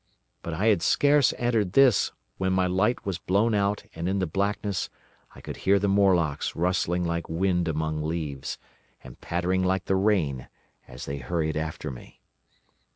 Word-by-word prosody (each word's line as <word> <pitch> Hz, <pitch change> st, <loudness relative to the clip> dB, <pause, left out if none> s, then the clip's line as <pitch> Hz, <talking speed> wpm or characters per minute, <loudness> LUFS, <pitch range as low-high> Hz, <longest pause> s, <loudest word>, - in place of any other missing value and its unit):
But 85 Hz, -, -5 dB
I 95 Hz, +6 st, -1 dB
had 105 Hz, -6 st, +4 dB
scarce 145 Hz, +7 st, +4 dB
entered 115 Hz, -6 st, 0 dB
this 135 Hz, -6 st, +5 dB, 0.3 s
when 95 Hz, 0 st, +1 dB
my 95 Hz, 0 st, +2 dB
light 95 Hz, +7 st, 0 dB
was 95 Hz, -3 st, -2 dB
blown 105 Hz, +7 st, +1 dB
out 100 Hz, 0 st, 0 dB
and 85 Hz, +2 st, -3 dB
in 95 Hz, -, 0 dB
the 95 Hz, -, +1 dB
blackness 100 Hz, +2 st, -2 dB, 0.5 s
I -, -, -12 dB
could -, -, -7 dB
hear 100 Hz, +1 st, +3 dB
the 100 Hz, +1 st, 0 dB
Morlocks 90 Hz, -7 st, +2 dB
rustling 90 Hz, 0 st, 0 dB
like 85 Hz, -1 st, -2 dB
wind 90 Hz, +1 st, 0 dB
among 80 Hz, -1 st, -1 dB
leaves, 75 Hz, -4 st, -4 dB, 0.5 s
and -, -, -13 dB
pattering 90 Hz, +2 st, 0 dB
like 95 Hz, -1 st, 0 dB
the 95 Hz, -, +1 dB
rain, 95 Hz, -, +1 dB, 0.4 s
as 60 Hz, +1 st, -9 dB
they 70 Hz, -, -4 dB
hurried 80 Hz, +4 st, -2 dB
after 75 Hz, -1 st, -4 dB
me. 60 Hz, -, -13 dB
90 Hz, 165 wpm, -26 LUFS, 80-100 Hz, 0.5 s, this